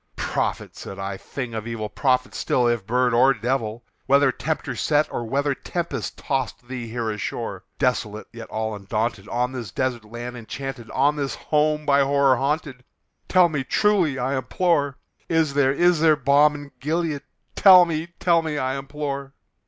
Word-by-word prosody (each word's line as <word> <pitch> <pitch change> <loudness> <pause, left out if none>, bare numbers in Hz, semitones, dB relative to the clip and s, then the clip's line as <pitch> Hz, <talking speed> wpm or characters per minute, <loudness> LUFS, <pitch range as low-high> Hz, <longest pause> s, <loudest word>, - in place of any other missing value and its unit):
"Prophet!" - - -2
said 95 - -8
I, 95 0 -4
"thing 125 +4 -6
of 110 0 -4
evil! 115 -2 -3
prophet 130 +2 0
still, 125 - +1
if 120 -4 0
bird 125 +1 +2
or 130 +3 +5
devil! 115 0 -2 0.2
Whether 140 0 +5
Tempter 155 +5 -3
sent, 150 0 +1
or 120 - -3
whether 140 +4 0
tempest 145 -5 -4
tossed 130 -3 -3
thee 125 -2 -5
here 115 -1 -2
ashore, 105 -1 -5
Desolate 115 -5 -1
yet 115 -1 -9
all 110 0 -2
undaunted, 105 +1 -3
on 125 +1 0
this 120 -5 -6
desert 125 +2 -2
land 120 +3 -7
enchanted 125 +1 -7
On 145 +3 +2
this 140 -2 -2
home 150 0 0
by 140 -1 +4
Horror 140 -1 +3
haunted 140 -1 -2 0.5
tell 180 -1 +6
me 150 -5 -2
truly, 180 -4 +2
I 135 +2 -1
implore 145 +1 0 0.3
Is 160 -3 +2
there 140 -1 +3
is 175 +3 +3
there 155 -1 +5
balm 145 +2 +4
in 145 -1 -9
Gilead? 155 0 -1 0.3
tell 185 -2 +8
me 165 -1 -3
tell 170 -2 +3
me, 155 -2 -3
I 130 0 -1
implore!" 140 -1 -5
135 Hz, 170 wpm, -23 LUFS, 120-150 Hz, 0.5 s, tell